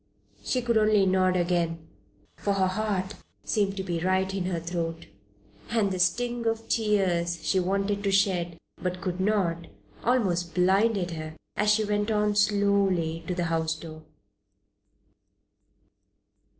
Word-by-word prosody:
She 250 Hz, -2 st, -1 dB
could 235 Hz, -2 st, +2 dB
only 215 Hz, -2 st, +4 dB
nod 185 Hz, -1 st, +2 dB
again, 170 Hz, -2 st, -1 dB, 0.5 s
for 200 Hz, -, -1 dB
her 195 Hz, -1 st, +2 dB
heart 190 Hz, 0 st, -1 dB, 0.3 s
seemed 200 Hz, -2 st, 0 dB
to 190 Hz, -, -2 dB
be 175 Hz, -3 st, -2 dB
right 190 Hz, +2 st, +1 dB
in 190 Hz, -2 st, -2 dB
her 180 Hz, -2 st, -1 dB
throat, 165 Hz, -1 st, -4 dB, 0.6 s
and 220 Hz, -4 st, +1 dB
the 185 Hz, -, -3 dB
sting 235 Hz, +6 st, 0 dB
of 225 Hz, 0 st, 0 dB
the -, -, -23 dB
tears 185 Hz, -6 st, +1 dB
she 190 Hz, +4 st, +2 dB
wanted 195 Hz, +2 st, 0 dB
to 200 Hz, -, +2 dB
shed, 180 Hz, -4 st, +1 dB, 0.2 s
but 180 Hz, 0 st, -2 dB
could 180 Hz, 0 st, -3 dB
not, 185 Hz, -5 st, 0 dB, 0.4 s
almost 185 Hz, -9 st, +1 dB
blinded 190 Hz, +1 st, +2 dB
her 155 Hz, -1 st, -6 dB, 0.2 s
as 210 Hz, -, +1 dB
she 215 Hz, +1 st, +3 dB
went 205 Hz, 0 st, 0 dB
on 210 Hz, -1 st, +1 dB
slowly 200 Hz, -5 st, +2 dB
to 180 Hz, -, -2 dB
the 175 Hz, -, -1 dB
house 160 Hz, -1 st, 0 dB
door. 155 Hz, 0 st, -10 dB
190 Hz, 145 wpm, -27 LUFS, 175-205 Hz, 0.6 s, only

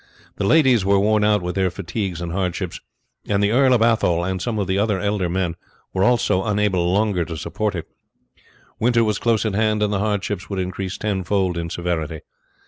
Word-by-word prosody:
The 100 Hz, -, 0 dB
ladies 130 Hz, -8 st, +4 dB
were 100 Hz, +1 st, +3 dB
worn 105 Hz, +1 st, +2 dB
out 105 Hz, -2 st, +2 dB
with 90 Hz, 0 st, -2 dB
their 95 Hz, -1 st, +1 dB
fatigues 90 Hz, -1 st, -4 dB
and 85 Hz, -1 st, -4 dB
hardships, 90 Hz, -1 st, -3 dB, 0.5 s
and 100 Hz, 0 st, +2 dB
the 100 Hz, -, +2 dB
Earl 130 Hz, +2 st, +4 dB
of 120 Hz, -3 st, +4 dB
Athole, 100 Hz, -7 st, +2 dB
and 95 Hz, 0 st, -2 dB
some 120 Hz, -3 st, -2 dB
of 100 Hz, -, 0 dB
the 95 Hz, +1 st, 0 dB
other 105 Hz, -2 st, +1 dB
elder 100 Hz, -3 st, -1 dB
men, 90 Hz, -1 st, -1 dB, 0.4 s
were 95 Hz, -, +1 dB
also 120 Hz, -4 st, +2 dB
unable 100 Hz, -4 st, +1 dB
longer 100 Hz, -2 st, +1 dB
to 80 Hz, 0 st, -6 dB
support 95 Hz, +6 st, -2 dB
it. 85 Hz, -, -5 dB, 0.9 s
Winter 120 Hz, 0 st, +3 dB
was 105 Hz, -2 st, 0 dB
close 115 Hz, -2 st, +1 dB
at 110 Hz, -, 0 dB
hand, 105 Hz, 0 st, +1 dB
and 105 Hz, 0 st, 0 dB
the 100 Hz, -, 0 dB
hardships 100 Hz, -2 st, -2 dB
would 100 Hz, -, -3 dB
increase 95 Hz, +1 st, -3 dB
ten 100 Hz, -3 st, -2 dB
fold 95 Hz, -1 st, 0 dB
in 85 Hz, 0 st, -3 dB
severity. 80 Hz, -3 st, -3 dB
100 Hz, 205 wpm, -21 LUFS, 90-105 Hz, 0.9 s, ladies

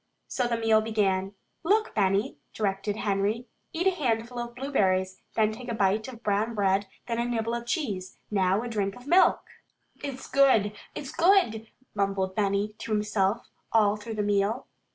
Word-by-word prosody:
So 250 Hz, -2 st, -1 dB
the 235 Hz, -1 st, 0 dB
meal 225 Hz, -1 st, +4 dB
began. 200 Hz, -3 st, 0 dB, 0.3 s
"Look, 425 Hz, +6 st, +2 dB
Benny," 200 Hz, +4 st, +1 dB, 0.2 s
directed 200 Hz, 0 st, -1 dB
Henry. 210 Hz, +3 st, 0 dB, 0.3 s
"Eat 340 Hz, +3 st, -2 dB
a 385 Hz, -, +5 dB
handful 240 Hz, -7 st, -1 dB
of 240 Hz, 0 st, -5 dB
blueberries, 190 Hz, -9 st, 0 dB
then 215 Hz, -1 st, +3 dB
take 240 Hz, +3 st, -9 dB
a 235 Hz, -, -1 dB
bite 210 Hz, +2 st, +1 dB
of 240 Hz, -3 st, -10 dB
brown 215 Hz, +3 st, 0 dB
bread, 195 Hz, -1 st, +2 dB, 0.2 s
then 230 Hz, -1 st, -2 dB
a 235 Hz, -, +1 dB
nibble 230 Hz, -1 st, -1 dB
of 235 Hz, 0 st, -4 dB
cheese. 205 Hz, -, -3 dB
Now, 195 Hz, +1 st, +2 dB
a -, -, -4 dB
drink 200 Hz, -4 st, -2 dB
of 245 Hz, -, -13 dB
milk!" 350 Hz, +6 st, +5 dB, 0.6 s
"It's 270 Hz, -2 st, -5 dB
good! 255 Hz, -7 st, +4 dB, 0.2 s
It's 275 Hz, -, -6 dB
good!" 335 Hz, -, +3 dB, 0.3 s
mumbled 195 Hz, -2 st, 0 dB
Benny 200 Hz, 0 st, +1 dB
to 230 Hz, -, -6 dB
himself 210 Hz, +1 st, 0 dB, 0.2 s
all 210 Hz, -2 st, +4 dB
through 220 Hz, +1 st, -7 dB
the 210 Hz, -, 0 dB
meal. 205 Hz, +4 st, +1 dB
220 Hz, 170 wpm, -27 LUFS, 200-240 Hz, 0.6 s, a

